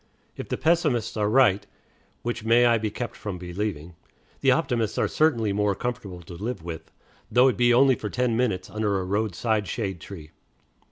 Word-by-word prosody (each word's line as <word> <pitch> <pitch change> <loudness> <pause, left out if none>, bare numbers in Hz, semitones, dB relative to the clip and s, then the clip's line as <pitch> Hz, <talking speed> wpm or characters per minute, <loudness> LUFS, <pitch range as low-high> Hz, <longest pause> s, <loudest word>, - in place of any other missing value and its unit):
If - - -7
the - - -1
pessimists 150 -9 +1
are 105 -1 0
right, 105 -5 +3 0.6
which 120 -1 -3
may 115 +2 +4
I 115 -1 +4
be 110 0 -2
kept 115 +3 -5
from 100 -4 -6
believing, 90 -2 -4 0.5
the - - +2
optimists 115 -3 +1
are - - +2
certainly 115 -10 +1
more 105 -1 +1
comfortable 105 -8 -5
to 85 - -11
live 105 +1 -5
with, 85 -2 -7 0.4
though 125 +2 +5
it - - -1
be 120 -1 +3
only 130 +2 +5
for 105 -3 -4
ten 125 +1 0
minutes 105 -7 0
under 105 -2 -1
a - - -3
roadside 105 +2 -1
shade 95 -6 -3
tree. 80 -4 -10
110 Hz, 180 wpm, -25 LUFS, 95-120 Hz, 0.6 s, though